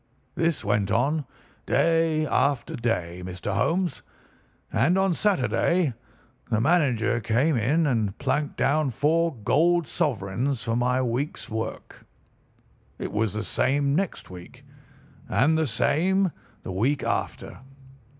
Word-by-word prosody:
"This 165 -2 0
went 100 -1 +1
on 140 +7 +1 0.4
day 165 -2 +2
after 140 -4 0
day, 90 -7 -2
Mr. 90 -1 -4
Holmes, 175 -2 0 0.7
and 180 +3 +3
on 190 -1 +2
Saturday 175 - +1 0.6
the 110 -3 +1
manager 120 -6 +2
came 125 +7 +1
in 140 +9 +2
and 110 -8 0
planked 150 -1 -1
down 150 0 +2
four 160 +5 +1
golden 165 +10 +2
sovereigns 120 - -1
for 115 -1 -1
my 125 +2 +1
week's 125 +5 -3
work. 110 +1 -5 0.9
It - - -5
was 110 -1 0
the 110 0 -3
same 140 +6 +1
next 185 - -2
week, 90 -1 -12 0.6
and 135 +11 +3
the 160 -1 +1
same 160 - +1 0.3
the - - -5
week 125 +10 0
after. - - -3
135 Hz, 120 wpm, -25 LUFS, 115-160 Hz, 0.9 s, and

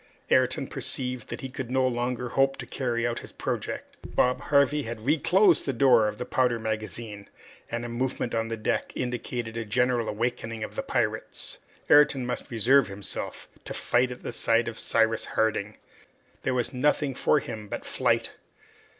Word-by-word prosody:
Ayrton - - +3
perceived 125 -2 -2
that - - -6
he 135 - -5
could 130 -3 -5
no 130 0 +2
longer 125 0 -2
hope 135 +2 +2
to 125 - -6
carry 120 -1 -1
out 120 0 -1
his - - -10
project. - - -4 0.2
Bob 125 0 +3
Harvey 145 +1 +4
had 115 -3 -6
reclosed 170 +5 +4
the 135 - +1
door 120 -3 +5
of 105 0 -3
the 125 - -4
powder 125 -1 +2
magazine, 110 -1 -4 0.4
and 120 0 -3
a - - -3
movement 120 0 -2
on 115 0 0
the 115 0 -3
deck 110 - -1
indicated 120 -2 -3
a 115 - -1
general 120 +1 +1
awakening 115 0 -2
of - - -6
the - - -1
pirates. - - -2 0.3
Ayrton 145 -3 +5
must 125 0 -4
reserve 125 +3 +4
himself 100 0 -5 0.2
to - - -6
fight 125 +1 +2
at 125 - -8
the - - -3
side 115 0 +2
of 115 - -5
Cyrus 115 0 +2
Harding. 105 -1 +1 0.6
There 130 - 0
was 125 +2 -1
nothing 145 +1 +1
for 145 - +3
him 110 -5 -7
but - - -5
flight! - - +1
120 Hz, 175 wpm, -27 LUFS, 115-130 Hz, 0.6 s, door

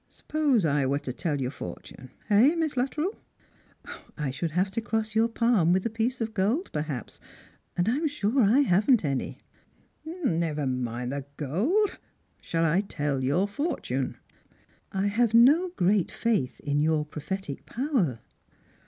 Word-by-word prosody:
" - - -43
Suppose 285 - 0
I 140 -3 +2
were 140 +1 +1
to 130 -3 -5
tell 150 +1 -2
your 130 -1 -2
fortune 130 +3 -9
— - - -31
eh. 245 +11 +6
Miss 320 -4 -1
Luttrell? 300 - -1 0.3
" - - -34
" - - -14
I 150 -4 -2
should 165 +6 -3
have 180 +5 0
to 230 - -2
cross 220 -1 -2
yonr 225 +1 +3
^mlm 225 -8 +3
with 185 +2 +1
a 230 - -1
piece 230 +3 -1
of 225 -1 -3
gold, 225 - 0
per 150 - 0
haps, 145 -6 -6 0.6
and 175 +2 +1
I'm 285 +8 +1
sure 270 -3 +1
I 230 +6 +5
haven't 210 - +3
any." 135 -2 -2 0.7
•' 345 +2 -7 0.2
Never 155 -3 -1
mind 125 -1 -2
the 140 -1 -4
gold. 235 - 0 0.4
Shall 165 0 0
I 165 +5 +3
tell 145 -8 -2
you 130 - -1
your 180 +9 +2
fortune? 205 - -2 0.4
" - - -36
"I - - +1
have 225 +2 +2
no 295 +10 +6
great 190 +1 +2
faith 215 - -1
in 145 0 0
your 155 -1 +1
prophetic 150 +1 -6
power." 230 - -1
195 Hz, 175 wpm, -27 LUFS, 145-245 Hz, 0.7 s, eh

